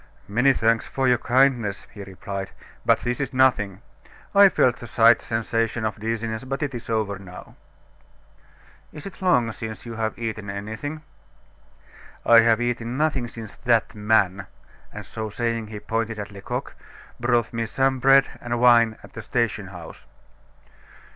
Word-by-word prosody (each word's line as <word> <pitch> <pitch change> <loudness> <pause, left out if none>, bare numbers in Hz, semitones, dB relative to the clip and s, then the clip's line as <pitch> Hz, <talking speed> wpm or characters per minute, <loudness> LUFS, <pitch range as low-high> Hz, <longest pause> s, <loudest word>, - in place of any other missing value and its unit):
"Many 125 +7 +3
thanks 115 -3 +1
for 135 -1 -1
your 125 -1 +3
kindness," 125 -5 +2
he 100 -2 -8
replied, 95 0 -6 0.3
"but - - +3
this 120 0 -2
is 135 -1 -3
nothing. 105 -6 +2 0.5
I 200 -1 +8
felt 125 -8 +2
a 120 - -7
slight 115 +1 +5
sensation 115 0 -1
of 110 - -3
dizziness, 115 +1 -3
but 135 +3 -3
it 140 -2 -3
is 120 -1 -7
over 105 -3 -1
now." 90 -2 -12 1.4
"Is 150 - -10
it 195 - -10
long 125 -12 +3
since 110 0 -7
you 115 - -6
have 110 -1 -2
eaten 110 -3 -4
anything?" 110 +10 -6 1.2
"I 115 -1 +8
have 115 0 +4
eaten 120 0 -2
nothing 140 -5 0
since 115 -3 -9
that 115 -2 +1
man" 105 -3 +1 0.4
and - - -8
so 110 -1 -5
saying 115 0 -2
he 105 -1 -7
pointed 115 +1 -2
to 105 -1 -7
Lecoq 100 - -5 0.5
"brought 120 -1 +1
me 115 0 -2
some 135 +1 +1
bread 135 +1 +6 0.2
and 120 -1 -2
wine 115 -2 +5
at - - -14
the 115 - -7
station 110 -3 -1
house." 90 -4 -11
115 Hz, 155 wpm, -24 LUFS, 110-125 Hz, 1.4 s, I